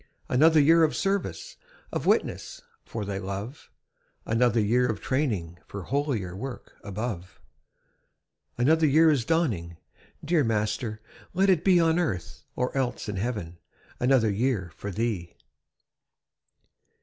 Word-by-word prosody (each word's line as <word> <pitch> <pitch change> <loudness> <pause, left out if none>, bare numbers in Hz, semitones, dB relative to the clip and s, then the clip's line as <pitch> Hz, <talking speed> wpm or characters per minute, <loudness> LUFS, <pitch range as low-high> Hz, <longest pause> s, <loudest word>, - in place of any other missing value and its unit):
Another 155 +5 +5
year 165 +3 +6
of 155 - +2
service, 200 - -2 0.3
Of - - -3
witness - - 0 0.2
for 105 -3 -5
Thy 100 -1 -3
love; 100 +8 -6 0.6
Another 120 +1 +2
year 120 +4 +3
of 110 - -2
training 105 - -2
For 100 -2 -7
holier 120 - -2
work 130 +6 -7
above. 100 -5 -5 1.2
Another 155 +6 +4
year 160 +3 +5
is 130 -6 0
dawning! 110 - 0 0.5
Dear 160 -1 +3
Master, 110 0 -1 0.3
let 195 +2 +4
it 170 -3 +2
be 185 -2 +5
On 165 0 +3
earth, 95 - -3
or 125 +2 -2
else 130 -3 -1
in 105 -2 -3
heaven, 95 -6 -4 0.4
Another 125 -4 +3
year 100 -4 -1
for 100 - -6
Thee! 100 -4 -3
120 Hz, 125 wpm, -27 LUFS, 100-150 Hz, 1.2 s, year